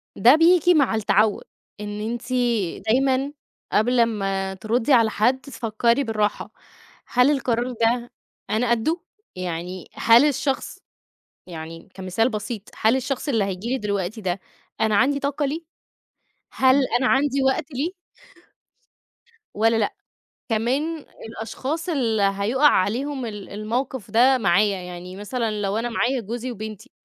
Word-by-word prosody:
ده 245 +8 +6
بييجي 350 +1 +5
مع 275 -7 +3
التعود، 210 0 +2 0.4
إن 210 0 -5
أنتِ 240 +1 -6 0.6
دايمًا 265 +3 +2 0.4
قبل 245 +3 +2
امّا 195 -4 0
تردي 225 +7 0
على 230 -3 +5
حد 245 +5 +2
تفكري 235 0 0
بالراحة. 210 -3 -1 0.6
هل 250 +4 +4
القرار 250 -3 0
ده 235 +1 0 0.4
أنا 230 +3 +1
قده؟ 315 +10 +1 0.3
يعني 180 0 -5
هل 235 +5 +5
الشخص 275 -1 -1 0.7
يعني 165 +2 -9
كمثال 190 +6 0
بسيط، 215 -1 -5
هل 220 +4 +4
الشخص 265 +2 -3
اللي 225 -6 +2
هييجي 195 +4 -4
لي 265 - 0
دلوقتي 205 0 -3
ده 185 0 -2 0.4
أنا 220 -1 +2
عندي 280 +6 +3
طاقة 285 +1 -1
ليه؟ 305 +4 -3 0.9
هل 260 0 +4 0.2
أنا 260 - +1
عندي 275 0 +2
وقت 265 +4 +1
ليه 290 +7 -1 1.6
والّا 225 +2 +3
لأ؟ 210 -2 0 0.6
كمان 275 +8 -1 0.2
الأشخاص 270 +9 -4
اللي 235 -9 0
هيقع 240 +9 +3
عليهم 255 +7 0
ال 210 -3 -7
الموقف 230 +3 -4
ده 255 +3 +5
معايا، 200 -1 +2
يعني 180 +1 -8
مثلًا 215 0 -3
لو 200 +1 -1
أنا 235 +2 -1
معايا 245 +2 0
جوزي 235 +4 -5
وبنتي، 215 -2 -8
230 Hz, 130 wpm, -23 LUFS, 205-265 Hz, 1.6 s, ده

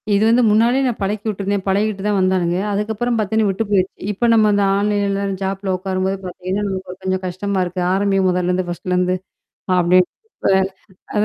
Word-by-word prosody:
இது 205 - +3
வந்து 245 +2 +4
முன்னாடியே 235 +5 +3
நான் 240 - -2
பழக்கி 210 +2 -2
விட்டுருந்தேன். 200 -1 -2
பழகிட்டு 200 0 0
தான் 205 -1 +1
வந்தானுங்க. 185 -2 +1
அதுக்கப்புறம் 220 +3 -1
பாத்தீங்கன்னா, 215 0 +1
விட்டு 195 +3 -1
போயிருச்சு. 190 -2 +1 0.2
இப்ப 220 +4 0
நம்ம 215 -2 +4
அந்த 200 - +2
ஆன்லைன்ல 200 -1 0 0.2
ஜாப்ல 195 0 -2
உக்காரும்போது 190 +1 -2
பாத்தீங்கன்னா, 185 +2 -3
நமக்கு 190 -1 -5
ஒரு 185 - -18
கொஞ்சம் 185 0 -1
கஷ்டமா 190 +2 -2
இருக்கு. 180 +1 -4
ஆரம்பி 195 0 +1
முதல்லேருந்து 180 0 0
ஃபர்ஸ்ட்லேருந்து. 180 +1 0 0.6
அப்டீ 180 +1 +5 0.3
இப்ப - - 0 0.6
அத 210 - +3
195 Hz, 165 wpm, -19 LUFS, 185-210 Hz, 0.6 s, அப்டீ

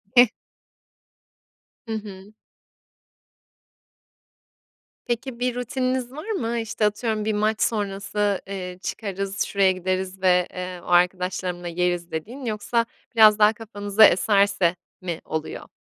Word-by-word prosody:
Heh. 245 0 +9 1.6
Hı 225 - -7
hı. 205 -2 -8 2.7
Peki, 240 0 -3
bir 250 0 0
rutininiz 255 0 -2
var 310 +10 -8
mı? 235 - -1
İşte, 225 -1 -1
atıyorum 215 0 -1
bir 220 - +1
maç 215 +1 0
sonrası, 205 -1 0
eee, 180 -2 -5
"Çıkarız, 195 -1 -3
şuraya 195 -2 +3
gideriz 185 +1 -3
ve, 180 -1 +4
eee, 180 -1 -6
o - - -14
arkadaşlarımla 180 0 +1
yeriz." 175 0 -1
dediğin 230 - -6
yoksa 230 +1 0 0.3
biraz 215 -1 +7
daha 210 +1 +6
kafanıza 210 -1 +3
eserse 200 -2 +3 0.3
mi 175 -3 -4
oluyor? 160 0 -5
205 Hz, 115 wpm, -24 LUFS, 185-225 Hz, 2.7 s, Heh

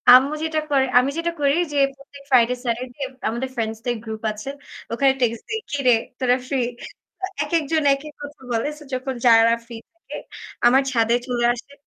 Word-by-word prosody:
আম্মু 275 +4 +5
যেটা 315 -1 0
করে 270 -2 +3
আমি 260 +2 +1
যেটা 340 0 -1
করি 280 0 +3 0.2
যে, - - -1 0.2
প্রত্যেক 275 0 -15
ফ্রাইডে, 250 -2 +4
স্যাটারডে 245 +2 -3 0.3
আমাদের 240 +4 -3
ফ্রেন্ডস 225 -2 -2
দের 245 - 0
গ্রুপ 220 -1 -6
আছে। 215 +5 -7 0.4
ওখানে 270 +4 +3
টেক্সট 230 -2 0
দিই, 445 0 -1
"কিরে 275 -4 +3 0.3
তোরা 250 -1 +3
ফ্রি?" 270 -1 0 0.6
আ - - +3 0.2
একেকজন 310 0 0
একেক 295 +2 -6
কথা 290 -1 -9
বলে। 230 +4 0
সো 300 - -12
যখন 260 +1 -2
যারা 230 0 +6
ফ্রি 235 0 -9 0.2
থাকে 335 - -10 0.5
আমার 260 +3 +5
ছাদে 230 -2 +3
চলে 245 -2 -1
আসে। 260 +4 -11
260 Hz, 175 wpm, -22 LUFS, 235-285 Hz, 0.6 s, যারা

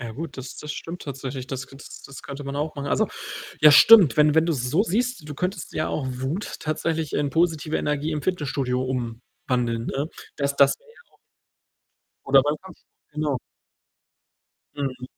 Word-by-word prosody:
Ja 115 -3 -6
gut, 150 +3 -7
das 130 0 -7
das 150 0 -6
stimmt 170 +2 -7
tatsächlich. 135 -2 -6
Das 135 -1 -5
k 135 - -14
das - - -11
das 140 - -11
könnte 140 0 -7
man 140 +1 -4
auch 155 +1 -2
machen. 140 -1 -5
Also 220 +5 +2 0.5
ja, 150 0 +9
stimmt. 190 -1 +8
Wenn 150 0 +5
wenn 160 +1 +5
du's 145 -8 -1
so 175 +9 +3
siehst, 230 -4 -1
du 150 - -6
könntest 180 +7 -3
ja 155 - -1
auch 145 - -2
Wut 130 +10 -4
tatsächlich 160 0 -2
in 145 -1 +1
positive 160 -1 +1
Energie 150 +1 -1
im 150 -2 -2
Fitnessstudio 140 -7 -1
umwandeln, 120 -1 -3
ne? 140 +3 -2 0.3
Das 140 -1 -1
das 140 -1 +5
wär - - -27
ja 460 - -19
auch - - -27 1.1
Oder 135 -1 +6
beim 150 +1 0
Kampfsport. 190 -3 -15 0.2
Genau. 150 -3 -1 1.4
Mhm. 130 -3 -4
145 Hz, 180 wpm, -24 LUFS, 135-160 Hz, 1.4 s, ja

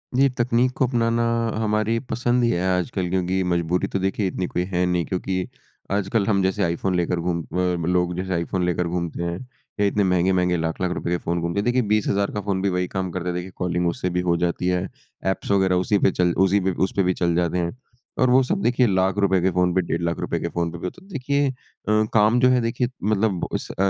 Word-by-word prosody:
जी 135 +2 +5
तकनीक 120 +1 +2
को 130 - +3
अपनाना 115 -1 +1 0.4
हमारी 110 +1 +1
पसंद 120 +1 +1
ही 120 - +3
है 90 -6 0 0.2
आजकल, 90 -1 -2
क्योंकि 95 +1 0
मजबूरी 85 +2 0
तो - - +2
देखिए 95 +1 0
इतनी 90 0 -2
कोई 90 - -1
है 90 +1 +2
नहीं। 90 -2 0
क्योंकि 95 0 -2 0.4
आजकल 100 +1 +1
हम 100 -3 +2
जैसे 95 +2 +1
आईफ़ोन 85 +2 0
लेकर 90 0 0
घूम 85 -1 -1 0.5
लोग 90 0 +1
जैसे 95 0 -2
आईफ़ोन 90 +1 -1
लेकर 90 0 0
घूमते 85 0 -3
हैं 85 0 -2 0.4
या 105 - +3
इतने 100 +1 +2
महँगे-महँगे 90 -1 +2
लाख-लाख 80 +2 -2
रुपये 85 0 -2
के - - +1
फ़ोन 85 0 -1
घूमते 85 +3 -1
हैं। 100 - -1
देखिए 120 +1 +2
20 105 -1 +1
हज़ार 100 0 +1
का 105 - -3
फ़ोन 100 -1 -1
भी 100 - +1
वही 90 0 -1
काम 95 0 -3
करता 90 0 -4
है, 90 - -1
देखिए 90 +1 -5
कॉलिंग 90 -1 -1
उससे 85 +1 -1
भी - - +2
हो 85 - +3
जाती 85 +1 -2
है। 90 +1 0 0.4
एप्स 95 - -4
वगैरह 95 -2 +3
उसी 105 - +3
पे 95 - +3
चल 90 -1 +1
उसी 100 +2 +3
पे - - +3 0.2
उस - - -12
पे 100 - +3
भी 90 0 +2
चल 85 -1 0
जाते 85 0 +1
हैं। 85 +3 -2 0.5
और 130 - +4
वो 130 +2 +6
सब 195 +9 -1
देखिए 125 -3 +3
लाख 95 0 +1
रुपये 95 -2 +3
के 95 - +3
फ़ोन 90 0 +1
पे, 95 - +4
डेढ़ 85 -1 -2
लाख 85 0 -1
रुपए - - -2
के - - -2
फ़ोन 85 0 -2
पे 85 - -7
भी 85 - -7
होता। 185 - -10
देखिए 140 0 0
अ, - - -2 0.6
काम 110 +2 +4
जो 125 0 +5
है 125 0 +4
देखिए 115 +2 0 0.2
मतलब 105 -3 +1
उस - - -3
अ, - - -11
95 Hz, 240 wpm, -23 LUFS, 90-105 Hz, 0.6 s, वो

